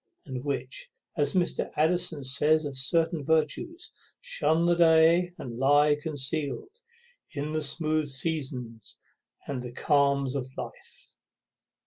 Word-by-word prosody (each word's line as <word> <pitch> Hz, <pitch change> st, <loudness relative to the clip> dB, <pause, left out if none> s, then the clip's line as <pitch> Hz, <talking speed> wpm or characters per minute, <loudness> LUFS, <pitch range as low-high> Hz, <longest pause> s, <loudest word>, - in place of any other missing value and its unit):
And 130 Hz, -2 st, -6 dB
which, 135 Hz, -3 st, -4 dB, 0.3 s
as 145 Hz, +4 st, 0 dB
Mr. 175 Hz, -2 st, 0 dB
Addison 165 Hz, -2 st, +1 dB
says 150 Hz, +4 st, +3 dB
of 140 Hz, -2 st, -5 dB
certain 160 Hz, +4 st, +1 dB
virtues, 160 Hz, -, -1 dB, 0.3 s
Shun 330 Hz, -, +1 dB
the 175 Hz, -, +4 dB
day, 170 Hz, +1 st, +4 dB
and 120 Hz, -2 st, -7 dB
lie 145 Hz, +2 st, +4 dB
conceal'd 155 Hz, -, -3 dB, 0.5 s
In 150 Hz, 0 st, -4 dB
the 155 Hz, -, 0 dB
smooth 155 Hz, +1 st, -1 dB
seasons 130 Hz, -6 st, -4 dB, 0.5 s
and 135 Hz, -3 st, -4 dB
the 125 Hz, -1 st, -7 dB
calms 140 Hz, 0 st, +1 dB
of 130 Hz, -2 st, -4 dB
life. -, -, -10 dB
150 Hz, 120 wpm, -27 LUFS, 135-165 Hz, 0.5 s, the